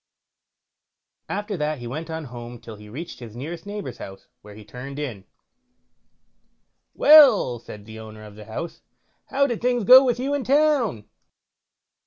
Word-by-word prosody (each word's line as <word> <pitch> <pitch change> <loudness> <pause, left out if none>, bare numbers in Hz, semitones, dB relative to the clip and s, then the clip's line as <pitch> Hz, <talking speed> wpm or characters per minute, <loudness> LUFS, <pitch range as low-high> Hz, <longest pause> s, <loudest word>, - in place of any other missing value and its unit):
After 205 +1 -3
that 150 0 -2
he 120 - -9
went 155 +8 -6
on 160 0 -5
home 120 -1 -9
till 115 -1 -11
he 105 0 -14
reached 155 +10 -8
his 115 -3 -11
nearest 165 +9 -7
neighbour's 205 0 -7
house, 95 0 -10 0.2
where 105 0 -13
he 105 0 -13
turned 135 +5 -9
in. 120 -10 -6 1.7
"Well", 260 - +6
said 105 -2 -12
the 110 0 -10
owner 110 -1 -11
of 105 -1 -12
the 105 0 -12
house, 115 +10 -7 0.5
"how 280 +1 +1
did 240 -5 -3
things 245 -1 +1
go 255 +6 +9
with 245 -3 0
you 275 +3 -2
in 285 -2 -1
town?" 275 - +1
150 Hz, 160 wpm, -23 LUFS, -, 1.7 s, go